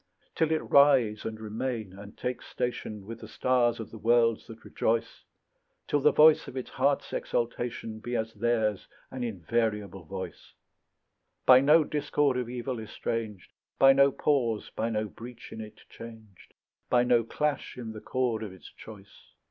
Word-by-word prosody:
Till 160 -1 +1
it 160 - +1
rise 130 -7 +4
and 110 -1 -5
remain 110 -1 -4
and 100 +1 -12
take 125 0 -3
station 120 -5 -4
With 115 +2 -8
the 110 - -10
stars 120 0 +1
of 115 - -7
the 110 - -10
worlds 115 0 +2
that 115 -1 -12
rejoice; 115 0 -1 0.6
Till 145 - +1
the - - +4
voice 155 0 +6
of 130 - -8
its 130 - -5
heart's 140 +2 0
exultation 465 - -3
Be 120 +2 -4
as 110 -1 -2
theirs 110 -2 0 0.2
an 130 -1 -5
invariable 105 -2 -2
voice; 95 +3 -8 0.9
By 130 0 +9
no 155 +3 +6
discord 145 -2 0
of 125 -2 -2
evil 125 0 -4
estranged, 110 -2 -5 0.3
By 135 0 +7
no 140 0 +5
pause, 120 -7 0
by 115 - -1
no 110 -1 -1
breach 115 +2 -11
in 110 - -7
it 110 0 -11
changed, 110 -4 -13 0.3
By 120 -1 +4
no 120 -1 +3
clash 145 +3 -2
in 115 -3 -6
the 110 -1 -9
chord 125 -4 -1
of 105 -3 -5
its 95 - -14
choice. 100 -3 -14
115 Hz, 165 wpm, -28 LUFS, 110-130 Hz, 0.9 s, By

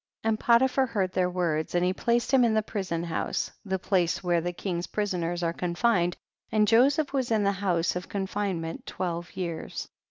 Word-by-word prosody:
76. - - -1
And 215 -1 0
Potiphar 260 +3 +4
heard 195 -6 -1
their 185 -1 +1
words, 170 -3 -1
and 175 0 +3
he 185 - +2
placed 235 +5 0
him 260 -2 +6
in 225 -2 +3
the 215 - +2
prison 185 -6 -3
house, 170 -1 -2
the 190 -3 -1
place 185 -1 0
where 175 -2 +2
the 175 +2 -2
king's 175 -1 -3
prisoners 175 -4 -2
are 165 0 0
confined, 175 0 +1 0.3
and 215 -1 +3
Joseph 275 +7 +4
was 260 -3 0
in 220 -2 +2
the 200 - +3
house 180 -4 0
of 180 - -5
confine 200 -2 -2
ment 165 0 -6
twelve 175 -1 -4
years. 170 -3 -4
185 Hz, 195 wpm, -27 LUFS, 175-220 Hz, 0.3 s, him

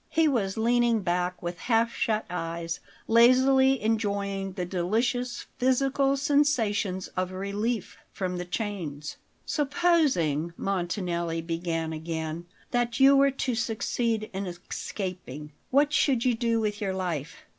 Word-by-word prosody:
He 325 -1 +3
was 215 -9 0
leaning 235 0 +3
back 180 0 -1
with 175 +1 -4
half 230 +1 +1
shut 215 -1 0
eyes, 165 -1 -4 0.3
lazily 260 +3 +5
enjoying 200 -3 -1
the 180 -1 -3
delicious 235 +7 -1
physical 270 +2 +2
sensation 255 -10 +1 0.2
of 185 0 -1
relief 200 +3 -3
from 180 -2 -3
the 180 - -4
chains. 175 -7 -4 0.3
"Supposing," 280 - +1
Montanelli 175 -3 -2
began 165 -1 -2
again, 160 +1 -4 0.2
"that 240 -1 0
you 270 +1 +7
were 275 0 +5
to 270 -1 -2
succeed 225 -1 -1
in 190 0 -3
escaping; 175 - -6 0.2
what 290 +2 +3
should 260 -5 +2
you 250 - +4
do 230 0 +1
with 210 -1 -2
your 190 -2 -1
life?" 175 -3 -4
205 Hz, 125 wpm, -27 LUFS, 175-245 Hz, 0.3 s, you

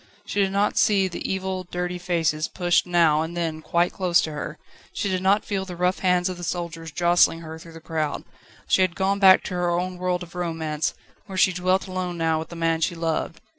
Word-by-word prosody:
She 205 - 0
did 195 -1 +1
not 200 +1 +1
see 195 -3 +3
the 175 - -4
evil, 190 -1 -3
dirty 180 0 -4
faces 165 -3 0
pushed 175 -1 +1
now 165 -3 +4
and 165 +2 -4
then 160 -2 -2
quite 170 +2 +1
close 180 -3 +2
to 160 - -3
her; 150 +1 -5 0.3
she 200 - -2
did 185 -1 -1
not 195 +3 +2
feel 195 -2 -2
the 185 -2 -7
rough 180 +2 0
hands 180 -1 +2
of 185 -1 -4
the 175 - -8
soldiers 165 -1 -4
jostling 170 0 +3
her 160 0 -8
through 165 0 -13
the 165 - -11
crowd: 155 -2 -3 0.4
she - - +3
had 185 -2 +2
gone 195 +1 0
back 190 -1 +7
to - - -5
her 175 -1 0
own 180 +1 -1
world 180 0 -1
of 175 - -13
romance, 160 -3 -2 0.3
where 190 -2 -6
she 185 0 +4
dwelt 185 +1 +1
alone 185 -2 -4
now 160 -1 +1
with 160 - -7
the 170 - -9
man 165 -1 0
she 170 +2 0
loved. 165 0 -2
175 Hz, 225 wpm, -24 LUFS, 165-185 Hz, 0.4 s, back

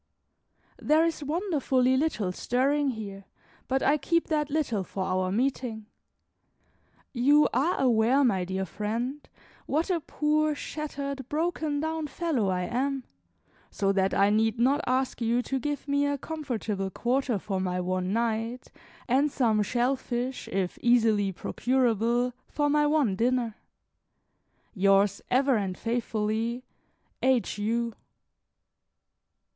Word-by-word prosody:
There 310 +2 +4
is 325 -2 -2
wonderfully 285 -6 +1
little 260 -10 0
stirring 275 +8 +1
here, 200 -5 -6 0.4
but 265 +1 0
I 295 +2 +3
keep 335 +5 0
that 300 -2 0
little 280 -10 0
for 190 +1 -4
our 185 0 0
meeting. 235 -1 -1 1.3
You 285 +4 +5
are 285 +9 +1
aware, 250 +2 +3
my 195 -8 +2
dear 190 +1 -2
friend, 230 - -3 0.5
what 320 +6 0
a 345 - +1
poor, 305 0 0
shattered, 280 -3 -5
broken 310 -2 -1
down 315 -1 -2
fellow 290 - -1
I 180 -1 0
am; 265 +5 -1 0.7
so 195 0 0
that 195 -1 +1
I 200 +1 +4
need 220 +2 +2
not 270 +6 +3
ask 255 0 0
you 235 +2 +1
to 270 +1 -2
give 290 +1 -3
me 285 0 +2
a 285 0 0
comfortable 235 -11 -3
quarter 245 +3 0
for 190 0 -3
my 180 -1 -1
one 185 +1 -1
night, 230 +2 -2 0.4
and 275 +4 +2
some 230 -6 +2
shell 245 +5 +1
fish, 250 0 -4
if 190 -2 -2
easily 220 -5 +3
procurable, 240 +3 0
for 290 -1 0
my 295 0 +3
one 295 -10 +2
dinner. 240 +1 +1 1.2
Yours, 195 0 +3
ever 265 0 +3
and 190 -3 -3
faithfully, 230 +1 -2 0.6
H. 255 -5 +1
U. 230 +2 -1
245 Hz, 130 wpm, -27 LUFS, 215-285 Hz, 1.3 s, You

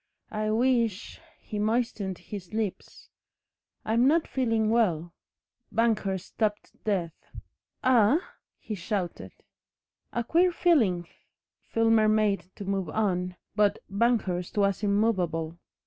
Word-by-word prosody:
"I 215 0 -1
wish 230 -3 +1
" - - -33
He 210 - -4
moistened 215 -4 -1
his 195 -4 -9
lips. 215 -4 -4 0.7
"I'm 230 +4 +3
not 320 +3 +3
feeling 225 -4 +1
well." 175 -8 +1 0.6
Banghurst 210 -5 +1
stopped 210 -2 -2
dead. 185 -6 0 0.7
"Eh?" 250 +1 +5 0.4
he 220 - -7
shouted. 190 -1 -3 0.8
"A 235 - -1
queer 345 +8 +3
feeling." 225 - +2 0.6
Filmer 225 -1 +3
made 210 -4 +1
to 200 - -7
move 195 -3 -1
on, 180 -2 -1 0.2
but 205 -1 +3
Banghurst 200 -5 0
was 200 -1 +2
immovable. 180 -6 0
210 Hz, 110 wpm, -27 LUFS, 190-230 Hz, 0.8 s, Eh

